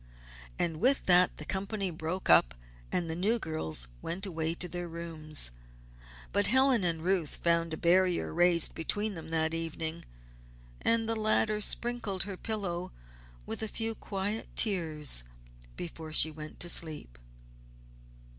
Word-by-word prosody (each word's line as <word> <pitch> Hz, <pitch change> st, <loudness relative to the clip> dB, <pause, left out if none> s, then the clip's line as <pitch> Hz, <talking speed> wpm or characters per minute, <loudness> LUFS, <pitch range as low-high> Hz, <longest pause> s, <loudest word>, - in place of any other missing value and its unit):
And 165 Hz, -2 st, -1 dB
with 265 Hz, +4 st, +4 dB
that 180 Hz, 0 st, +4 dB
the 150 Hz, -, -7 dB
company 195 Hz, +1 st, -3 dB
broke 165 Hz, +3 st, -4 dB
up 60 Hz, -7 st, +5 dB, 0.4 s
and 175 Hz, -2 st, -1 dB
the 160 Hz, -, -4 dB
new 205 Hz, +7 st, +1 dB
girls 80 Hz, -, -1 dB
went 185 Hz, +4 st, -4 dB
away 165 Hz, -3 st, -3 dB
to 180 Hz, -, -1 dB
their 175 Hz, +1 st, -6 dB
rooms. 160 Hz, -, -2 dB, 0.8 s
But 205 Hz, 0 st, +3 dB
Helen 260 Hz, -3 st, +3 dB
and 165 Hz, -2 st, -1 dB
Ruth 180 Hz, -4 st, 0 dB
found 170 Hz, -1 st, 0 dB
a 160 Hz, -, -4 dB
barrier 180 Hz, +1 st, +2 dB
raised 175 Hz, 0 st, +4 dB
between 205 Hz, +6 st, -2 dB
them 160 Hz, -3 st, -9 dB
that 160 Hz, 0 st, 0 dB
evening, 165 Hz, 0 st, -4 dB, 0.8 s
and 230 Hz, -1 st, +1 dB
the 225 Hz, -, -1 dB
latter 215 Hz, -1 st, +1 dB
sprinkled 225 Hz, -4 st, -1 dB
her 195 Hz, 0 st, -6 dB
pillow 185 Hz, -4 st, -3 dB, 0.5 s
with -, -, -3 dB
a 220 Hz, -, -1 dB
few 225 Hz, +1 st, -3 dB
quiet 205 Hz, +1 st, -4 dB
tears 155 Hz, -, +4 dB, 0.5 s
before 165 Hz, -2 st, -7 dB
she 155 Hz, +1 st, +6 dB
went 155 Hz, 0 st, -10 dB
to 175 Hz, -, +5 dB
sleep. 150 Hz, -, +2 dB
175 Hz, 145 wpm, -30 LUFS, 160-205 Hz, 0.8 s, she